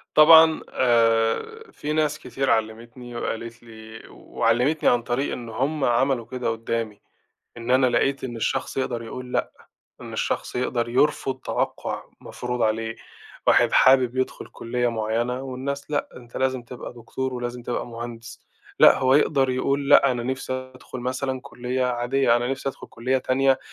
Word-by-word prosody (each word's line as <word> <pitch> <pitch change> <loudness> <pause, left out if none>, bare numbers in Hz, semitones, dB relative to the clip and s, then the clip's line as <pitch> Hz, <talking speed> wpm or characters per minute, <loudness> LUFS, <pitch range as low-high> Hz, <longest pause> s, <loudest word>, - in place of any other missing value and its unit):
طبعًا 160 +1 +8
آآ، 120 - +1
في 150 +1 -4
ناس 155 -1 0
كتير 135 0 -3
علّمتني 115 +2 -2
وقالت 115 0 -5
لي 110 -1 -12
وعلّمتني 125 +7 +1
عن 120 - +2
طريق 125 +4 -2
إن 120 -2 -7
هُم 135 +6 -2
عملوا 120 0 +2
كده 125 -1 -3
قدّامي، 115 -2 -3 0.6
إن 120 +1 -3
أنا 130 0 +5
لقيت 135 +3 +1
إن 120 -2 -4
الشخص 115 - -2
يقدر 120 -3 -2
يقول 125 +2 -8
لأ، - - 0 0.5
إن - - -9
الشخص - - -2
يقدر 120 -1 -1
يرفض 135 +1 +1
توقُّع - - -3 0.2
مفروض 125 -1 -4
عليه، 115 +1 -1 0.5
واحد - - +4
حابب 130 -1 +5
يدخُل 130 0 -2
كليّة 120 +1 -2
معيّنة 115 +3 -2
والناس 135 +2 -5
لأ، 145 - -1
أنت 120 -1 -12
لازم 130 -1 0
تبقى 120 +1 -9
دكتور 125 +2 -5
ولازم 120 0 -5
تبقى 120 - -3
مهندس 115 0 -9 0.3
لأ، - - +8
هو 130 0 +3
يقدر 135 -2 +3
يقول 140 +2 -1
لأ، 140 -2 +6
أنا 120 -1 -3
نَفْسي 130 +1 -3 0.2
أدخُل 130 0 -9
مثلًا 130 +1 -2
كليّة 125 +1 -3
عادية 120 0 +2
أنا 120 +1 -1
نَفْسي 135 0 -3
أدخُل 135 - -8
كليّة 130 +3 0
تانية 135 +1 +2
125 Hz, 155 wpm, -24 LUFS, 115-135 Hz, 0.6 s, طبعًا